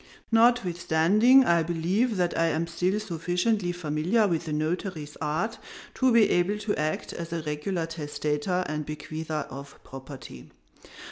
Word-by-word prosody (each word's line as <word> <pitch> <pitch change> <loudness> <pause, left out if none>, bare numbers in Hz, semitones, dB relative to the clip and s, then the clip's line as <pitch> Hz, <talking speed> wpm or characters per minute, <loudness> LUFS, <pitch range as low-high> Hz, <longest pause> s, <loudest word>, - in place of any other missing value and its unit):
Notwithstanding, 225 +1 +4
I 170 -1 +4
believe 180 +8 0
that 175 -1 0
I 165 - +2
am 165 0 0
still 180 +4 -1
sufficiently 180 +1 -1
familiar 175 +6 +1
with 170 -4 -1
the 155 - -5
notary's 155 0 -3
art 175 +10 -2 0.3
to 260 -1 +2
be 230 -2 +6
able 180 +4 +2
to 210 0 -2
act 155 +1 -2
as 170 -1 -6
a 165 -1 -3
regular 155 +4 -2
testator 155 +2 -2
and 150 0 -3
bequeather 155 0 -5
of 140 +1 -9
property. 130 - -10
170 Hz, 140 wpm, -27 LUFS, 155-200 Hz, 0.3 s, be